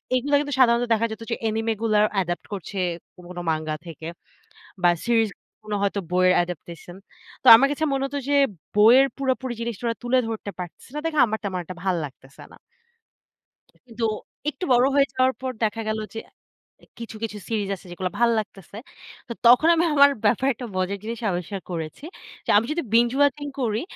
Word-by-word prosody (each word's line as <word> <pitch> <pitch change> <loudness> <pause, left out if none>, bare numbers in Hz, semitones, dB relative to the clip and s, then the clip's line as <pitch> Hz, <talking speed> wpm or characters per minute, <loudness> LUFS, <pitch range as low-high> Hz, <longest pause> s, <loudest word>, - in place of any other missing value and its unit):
এগুলা 285 +3 +1
কিন্তু 290 -1 -3
সাধারণত 240 -1 +4
দেখা 225 +1 +1
যেত 220 - -7
যে, 230 - 0
অ্যানিমে 225 0 0
গুলোর 215 -2 +3
অ্যাডাপ্ট 175 -3 -2
করছে 195 +1 -6 0.4
কোন, 180 - -15
কোন, 180 - -10
মাঙ্গা 155 0 -2
থেকে 160 0 -8 0.8
বা 175 - +6 0.2
সিরিজ 225 -2 +3 0.4
গুলো 210 -1 -3
হয়তো 200 0 0
বইয়ের 185 0 +4
অ্যাডাপ্টেশন। 175 0 -5 0.5
তো, - - -9
আমার 275 +4 +3
কাছে 310 +2 -2
মনে 270 0 0
হত 285 +1 -6
যে, 285 - +3 0.4
বইয়ের 240 +6 +7
পুরোপুরি 260 -2 -1
জিনিসটা 235 -1 -5
ওরা 230 -1 -1
তুলে 245 +1 +2
ধরতে 220 -2 -5
পারতেছে 180 +6 -9
না, 300 - -3
দেখে 310 -2 -2
আমার 220 0 -2
তেমন 190 -2 -2
একটা 185 +1 -9
ভাল্লাগতেছে 145 -7 -4
না। - - -16 1.3
কিন্তু 230 -1 -5 0.5
একটু 365 - -7
বড় 245 +1 +5
হয়ে 280 -1 +4
যাওয়ার 260 0 +3
পর 260 0 -3
দেখা 225 +1 -1
গেল 215 - -1 0.2
যে, - - -4 0.8
কিছু, 230 -1 -8
কিছু 215 -2 -4
,সিরিজ 210 -3 -1
আছে, 185 - -17
যেগুলো 180 +1 -3
ভাল্লাগতেছে। 215 -5 -1 0.5
তো - - -4
তখন, 245 +7 +7
আমি 335 +1 +2
আমার 285 0 +7
ব্যাপারে 245 +6 +3
একটা 245 +1 -7
মজার 185 +2 -1
জিনিস 230 +1 -5
আবিষ্কার 180 +2 -4
করেছি। 165 - -6 0.4
যে - - 0
আমি 225 +3 +3
যদি 340 +2 -1
বিঞ্জ 235 +1 +5
ওয়াচিং 285 0 +2
করি, 225 -1 -1
225 Hz, 180 wpm, -24 LUFS, 190-255 Hz, 1.3 s, বইয়ের